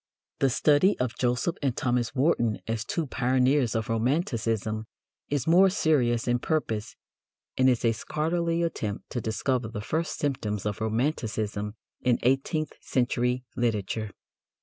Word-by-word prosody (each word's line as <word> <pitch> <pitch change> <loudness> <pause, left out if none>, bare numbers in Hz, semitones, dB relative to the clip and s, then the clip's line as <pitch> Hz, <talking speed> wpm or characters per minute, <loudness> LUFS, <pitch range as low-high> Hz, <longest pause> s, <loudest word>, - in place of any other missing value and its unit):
The 135 - +3
study 150 - +4
of 125 -2 -2
Joseph 125 +7 0
and 135 -4 0
Thomas 120 0 0
Warton 125 -6 +2
as 110 -1 -2
"two 165 +7 -2
pioneers 130 -1 +2
of 110 0 -1
romanticism" 115 - 0 0.4
is 140 -3 0
more 180 +4 +6
serious 130 - +2
in 120 0 +2
purpose, 115 -8 -2 0.6
and 130 0 +4
is 125 -2 +1
a 115 - +5
scholarly 165 +8 -1
attempt 110 -11 -3
to 120 - -2
discover 110 +3 -1
the 115 -1 -6
first 160 +10 -2
symptoms 105 -8 -2
of 105 0 -3
romanticism 110 -3 -1 0.3
in 125 -2 +3
eighteenth 135 +4 +1
century 125 0 0
literature. 110 -2 -1
125 Hz, 135 wpm, -27 LUFS, 110-145 Hz, 0.6 s, more